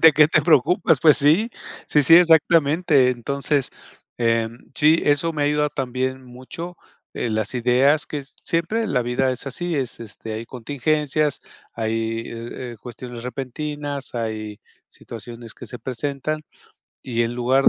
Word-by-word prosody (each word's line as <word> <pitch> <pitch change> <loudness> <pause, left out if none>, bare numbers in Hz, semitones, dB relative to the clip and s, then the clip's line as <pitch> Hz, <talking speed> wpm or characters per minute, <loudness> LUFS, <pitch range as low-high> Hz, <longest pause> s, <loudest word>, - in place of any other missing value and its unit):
¿De 160 -1 +8
qué 150 +1 +5
te - - +3
preocupas? 160 +1 +3
Pues, 155 -3 +7
sí, 160 +11 +4 0.4
sí, 150 - +3
sí, 155 +4 +7
exactamente. 160 -4 +4
Entonces, 140 +3 0 1.0
sí, 150 +4 +5
eh, - - +3
eso 145 +3 +1
me 150 -2 -2
ha - - +2
ayudado 150 0 +1
también 130 0 -3
mucho. 130 +8 -9 0.4
Eh, 120 - -2
las 110 +1 -2
ideas 130 +5 +3
que 145 -2 -5
siempre 170 +10 -2
la 125 - +1
vida 125 +2 0
es 130 +2 -4
así, 175 +4 -2
es, 130 -4 -3
este, 110 0 -8
hay 110 +2 -5
contingencias, 145 +4 -1 0.3
hay, 115 0 -2
eh 120 +1 -7
eh, - - -11
cuestiones 120 0 -8
repentinas, 140 +2 -5
hay 110 -2 -4 0.3
situaciones 115 0 -10
que - - -10
se 125 - -8
presentan, 140 +5 -3 0.6
y 120 -2 -1
en 115 0 -1
lugar 130 +3 +4
135 Hz, 150 wpm, -22 LUFS, 120-150 Hz, 1.0 s, De